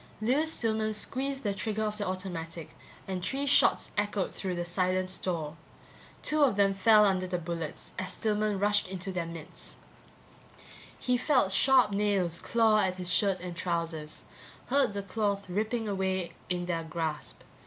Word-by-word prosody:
Lewis 285 +9 +2
Stillman 220 -1 0
squeezed 270 +5 -2
the 205 -2 0
trigger 215 +2 -2
of 210 0 -2
the 205 - -1
automatic 175 -4 -5 0.3
and 185 -2 -3
three 275 +8 0
shots 285 - +4
echoed 205 -2 -1
through 185 -2 -3
the 175 0 -2
silent 185 +1 0
store. 165 -5 -3 0.7
Two 305 0 +2
of 265 -7 +4
them 200 -1 +3
fell 210 +2 +6
under 185 -2 +1
the 180 0 -1
bullets 165 -2 -5
as 185 0 -3
Stillman 210 -1 0
rushed 205 0 +2
into 190 0 -4
their 175 -2 -2
midst. 165 +1 -9 1.2
He 250 0 +1
felt 255 -6 +2
sharp 255 +1 +5
nails 195 -4 +1
claw 225 -2 +3
at 185 -3 +1
his 180 -1 -1
shirt 195 +1 +2
and 175 -1 -6
trousers, 165 -3 -3 0.5
heard 275 -5 +3
the 200 0 -3
cloth 200 0 -1
ripping 220 +4 -1
away 190 -3 -1 0.2
in 175 -1 -1
their 170 -2 -2
grasp. 155 - -4
195 Hz, 160 wpm, -29 LUFS, 175-215 Hz, 1.2 s, fell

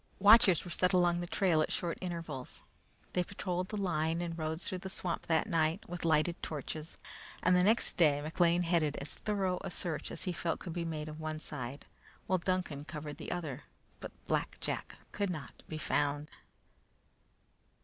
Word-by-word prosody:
Watchers 200 -4 +7
were 175 - -6
set 180 +2 +2
along 175 -1 +4
the 175 - -4
trail 180 -4 +3
at - - 0
short 170 -1 -2
intervals. 165 -7 -5 0.5
They 180 - +2
patrolled 185 -1 -3
the 210 - -3
line 165 -4 +1
and 170 -1 -3
roads 160 +1 -3
through 185 - -2
the 190 - -6
swamp 180 -2 -2
that 160 -1 +3
night, 165 +4 +1
with 175 0 -5
lighted 160 +2 +3
torches, 155 +1 -5 0.5
and 180 +1 +5
the 180 - +5
next 220 +5 +3
day 150 -4 +5
McLean 170 +3 +2
headed 165 -4 +2
as 140 - -4
thorough 195 -4 -1
a - - -4
search 165 -3 -3
as - - -5
he 180 - -1
felt 170 -1 -1
could 170 - -6
be 170 -1 -2
made 155 -2 -3
of 155 0 -7
one 155 0 -3
side, 140 -3 -5 0.4
while 185 -1 +2
Duncan 180 -5 -1
covered 150 -1 -6
the - - -6
other; 155 -6 -4 0.3
but - - -7
Black - - 0
Jack - - -3
could 200 -2 -1
not 155 -6 -6
be 155 - -4
found. 145 -1 0
170 Hz, 180 wpm, -33 LUFS, 155-180 Hz, 0.5 s, Watchers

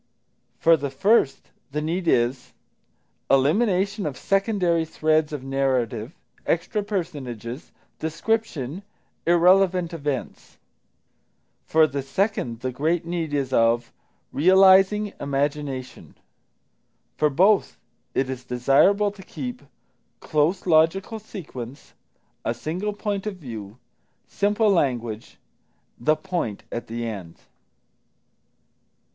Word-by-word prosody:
For 165 0 +5
the 140 -1 -3
first, 150 - +2 0.2
the 150 +2 -3
need 170 +4 -2
is 125 -1 +1 0.8
Elimination 190 - +2
of 135 -4 -5
secondary 195 -4 +1
threads 155 -1 +1
of 145 -3 -5
narrative, 130 -2 -1 0.3
extra 180 +5 0
personages, 145 - -5 0.3
description, 165 - -2 0.5
irrelevant 180 0 +4
events. 145 -5 -5 1.1
For 160 0 +5
the 140 -2 -3
second, 135 - -2
the 130 0 -2
great 160 +6 0
need 170 -2 -3
is 135 -2 -1
of 115 0 +2 0.4
Realising 190 +4 +5
Imagination. 140 -2 -3 1.0
For 150 - +2
both, 190 +8 +3 0.4
it 135 - +1
is 130 -1 -5
desirable 140 +12 +3
to 200 -1 -13
keep 250 +5 -6 0.6
Close 155 +5 0
Logical 180 +6 +2
Sequence, 145 - -9 0.5
A 115 - -1
Single 180 - -3
Point 205 0 -3
of 210 - -3
View, 110 - -8 0.5
Simple 205 +1 +2
Language, 120 - -1 0.6
_The 155 +5 +2
Point 170 - -3
at 120 - -5
the 115 +1 -4
End. 95 -7 -6
155 Hz, 100 wpm, -24 LUFS, 130-190 Hz, 1.1 s, For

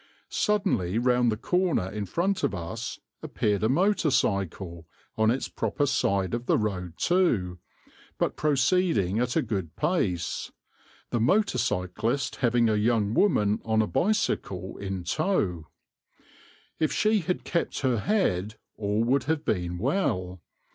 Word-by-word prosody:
Suddenly, 185 - 0
round 125 0 +3
the 110 - -2
corner 180 - +1
in 105 -1 -4
front 190 - 0
of 100 - +1
us, 95 +7 -5 0.2
appeared 105 -1 -1
a 110 - +3
motor 180 +3 +2
cycle, 95 - -1 0.3
on 110 0 +3
its 125 +4 0
proper 145 - -1
side 100 -8 0
of 120 +1 -3
the - - +4
road 90 -5 -2
too, 115 - +1 0.6
but - - 0
proceeding 140 - +2
at 125 0 0
a - - +2
good 95 -8 -4
pace, 90 - -1 0.6
the 120 - 0
motor 190 - +2
cyclist 115 +5 -1
having 120 -2 +2
a 110 - +2
young 110 -1 +1
woman 105 - +2
on 110 -1 +1
a 110 - +3
bicycle 135 - -1
in 95 -2 -4
tow. 90 - -1 1.1
If 155 - +1
she 215 0 +2
had 180 0 -2
kept 170 - -2
her 130 -5 +1
head 110 - 0 0.2
all 105 +1 0
would 130 +4 +1
have 160 0 -1
been 90 -3 -1
well. 95 - -1
115 Hz, 140 wpm, -27 LUFS, 95-155 Hz, 1.1 s, the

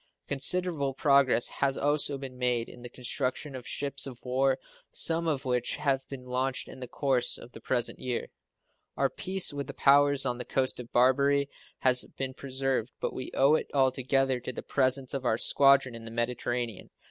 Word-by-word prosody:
Considerable 140 -1 +2
progress 140 -4 +4
has 135 -1 -1
also 145 0 +3
been 135 -2 -8
made 125 -2 0
in - - -11
the 120 - -8
construction 130 +3 -3
of 125 -2 -8
ships 140 -1 0
of 130 -3 -8
war, 130 +1 +1 0.3
some 165 0 +1
of 145 -3 -1
which 125 -1 0
have 135 -2 -1
been 130 -2 -8
launched 125 +1 -2
in - - -10
the 125 - -6
course 130 -2 0
of 120 - -13
the - - -12
present 120 -2 0
year. 125 -2 -3 0.7
Our - - +1
peace 190 -4 0
with 140 -2 -4
the - - -8
powers 140 0 +4
on 125 -1 -2
the - - -3
coast 130 +1 -1
of 120 -1 -9
Barbary 140 +3 +3 0.3
has 125 -1 +5
been 135 -1 -3
preserved, 130 -3 -2
but - - -3
we 130 - -5
owe 135 +3 +4
it 155 - 0
altogether 130 0 +2
to 125 - -5
the - - -7
presence 130 -1 +1
of 135 -2 -3
our 115 -3 +1
squadron 135 0 +3
in 115 -1 -9
the - - -7
Mediterranean. 120 -1 -3
130 Hz, 185 wpm, -29 LUFS, 125-140 Hz, 0.7 s, has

